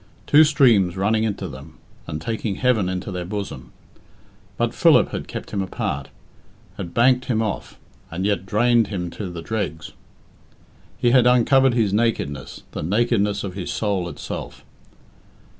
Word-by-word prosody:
Two 150 +2 +7
streams 115 - +4
running 110 +3 +1
into 100 -3 -3
them 70 +1 -11 0.3
and 75 - -4
taking 110 +3 -3
heaven 110 -7 +1
into 95 +1 -4
their 90 -1 -4
bosom. 85 -10 -6 0.9
But - - 0
Philip - - +5
had - - -5
kept - - -7
him 100 - -1
apart, 70 -7 -3 0.7
had 90 -3 -6
banked 125 +2 +4
him 115 -3 0
off, 105 - -4 0.3
and 90 +3 -3
yet 100 -2 0
drained 115 +2 +3
him 90 -4 -4
to 100 0 -6
the 85 -1 -7
dregs. 90 -8 -4 1.1
He 120 - +2
had 125 -1 +5
uncovered 125 +1 +4
his 110 -5 +1
nakedness 105 - -1
the - - -5
nakedness 105 +3 +1
of 95 -2 -5
his 90 -2 -5
soul 100 -5 -1
itself. - - -7
100 Hz, 150 wpm, -22 LUFS, 90-115 Hz, 1.1 s, Two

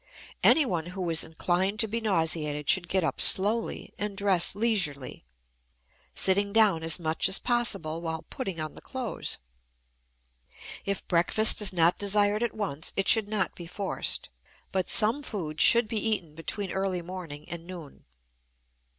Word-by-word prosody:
Anyone 180 - +3
who 180 0 -5
is 160 - +3
inclined 185 +5 -1
to 220 - +1
be 230 +2 -3
nauseated 160 -7 -1
should 175 +1 +2
get 185 +1 0
up 150 -5 -1
slowly 215 +4 +2
and 205 -1 -4
dress 190 -3 +2
leisurely, 180 - -1 0.9
sitting 200 +1 +2
down 210 -6 +3
as 160 -1 +3
much 160 -1 0
as 190 - +3
possible 195 -10 -1
while 160 -1 -4
putting 195 - -5
on 155 -1 -5
the - - -13
clothes. 255 -3 -4 1.5
If 200 -1 -4
breakfast 180 +6 +4
is 205 - +2
not 170 -1 +2
desired 205 +1 +2
at 235 - -2
once, 180 -8 -4
it 195 - -1
should 220 -3 +4
not 205 -4 -1
be 170 - -10
forced, 195 +3 -3 0.4
but 190 -1 -2
some 230 +6 +4
food 170 - -5
should 235 -1 +5
be 220 -1 -2
eaten 205 -8 -1
between 185 +5 -3
early 190 -2 -2
morning 165 -5 -8
and 170 0 -7
noon. 170 -6 -11
190 Hz, 150 wpm, -27 LUFS, 165-210 Hz, 1.5 s, should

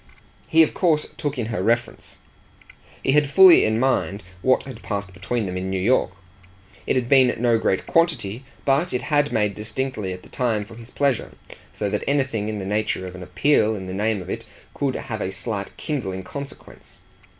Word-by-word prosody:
He 160 0 +6
of 155 - -1
course 160 -5 +1
took 145 -3 -3
in 120 - -1
her 90 - -1
reference, 120 +3 -1
and - - -26 0.3
he - - +2
had 145 0 +3
fully 185 +2 +8
in 110 +1 +1
mind 120 -5 0 0.2
what 130 +4 +3
had 135 - -10
passed 100 -3 -4
between 105 +5 -2
them 90 -1 -4
in 95 +1 -3
New 95 0 -1
York. 115 +2 +2 0.8
It - - +2
had 125 -2 0
been 130 -3 +4
no 120 -1 +3
great 95 - 0
quantity, 135 - +1 0.2
but 140 +5 +2
it 125 - -1
had 145 -1 +1
made 105 -2 +1
distinctly 110 -1 -4
at 90 0 -7
the - - -16
time 110 -5 -1
for 115 - -13
his 115 +1 -12
pleasure; 140 -4 0 0.4
so 105 - -3
that 105 - -1
anything 130 -7 0
in 110 - -3
the 95 - -5
nature 105 -1 -1
of 90 - -7
an 95 - -9
appeal 110 +5 +2
in 95 -2 -6
the 95 - -6
name 105 0 0
of - - -11
it - - -4 0.3
could 135 -2 -1
have 110 -2 -5
a 95 - -2
slight 100 +1 -5
kindling 95 -11 -3
consequence. 140 +8 -10
115 Hz, 200 wpm, -23 LUFS, 100-135 Hz, 0.8 s, fully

